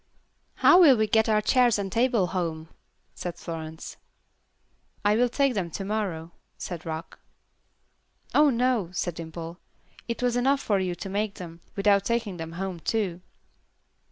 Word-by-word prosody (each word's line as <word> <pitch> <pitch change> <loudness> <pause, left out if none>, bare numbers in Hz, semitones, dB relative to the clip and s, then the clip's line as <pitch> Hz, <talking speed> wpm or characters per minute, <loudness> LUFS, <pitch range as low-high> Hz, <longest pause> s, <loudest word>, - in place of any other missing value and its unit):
"How 365 - +6
will 280 -8 +7
we 215 - +2
get 220 +1 +2
our 215 -1 +3
chairs 245 0 +3
and 195 -2 -3
table 235 -3 +2
home?" 165 -3 -3 0.4
said 175 -1 -5
Florence. 160 -1 -7 1.1
"I 205 +1 +4
will 245 +2 +3
take 275 +1 +1
them 190 -6 -2
to 195 +4 -5
morrow," 190 -6 -3 0.3
said 170 -3 -6
Rock. 160 0 -6 1.1
"Oh, 295 0 +6
no," 245 -6 +1
said 175 -1 -2
Dimple. 165 +1 -8 0.5
"It 235 +1 -3
was 245 -1 +1
enough 270 +3 +2
for 205 -7 0
you 185 -2 -2
to 190 - -7
make 205 +1 -2
them, 170 -2 -9
without 200 -1 +3
taking 230 -4 -1
them 165 0 -6
home, 185 0 -4
too." 185 -2 -2
200 Hz, 155 wpm, -26 LUFS, 170-235 Hz, 1.1 s, will